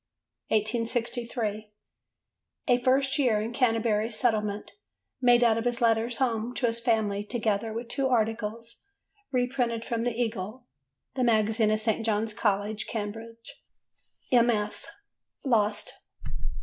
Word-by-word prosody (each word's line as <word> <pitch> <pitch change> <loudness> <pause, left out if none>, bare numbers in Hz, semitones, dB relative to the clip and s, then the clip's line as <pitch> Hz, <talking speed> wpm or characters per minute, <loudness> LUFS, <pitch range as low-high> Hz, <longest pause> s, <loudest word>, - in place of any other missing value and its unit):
1863. 230 0 -1 1.0
A 245 0 +4
First 270 +2 +2
Year 240 -6 +3
in 220 +3 -3
Canterbury 225 -3 +1
Settlement: 215 -3 0 0.5
made 245 -1 +5
out 230 -1 +4
of 225 - -4
his 240 0 +1
letters 230 0 +2
home 235 -1 -1
to 250 - 0
his 230 0 0
family 220 -4 +1
together 220 -1 -1
with 230 +2 -5
two 270 +3 0
articles 230 -1 -1 0.5
reprinted 245 -3 0
from 230 -1 -2
the 240 0 -2
Eagle 225 +1 -3 0.5
(the 260 -1 -1
magazine 220 -1 +3
of 215 0 +2
St. 220 0 0
John's 220 0 0
College, 205 0 -1
Cambridge): 225 +2 -7 0.7
MS. 235 -4 +2 0.6
lost. 215 -4 +2
230 Hz, 120 wpm, -28 LUFS, 215-240 Hz, 1.0 s, made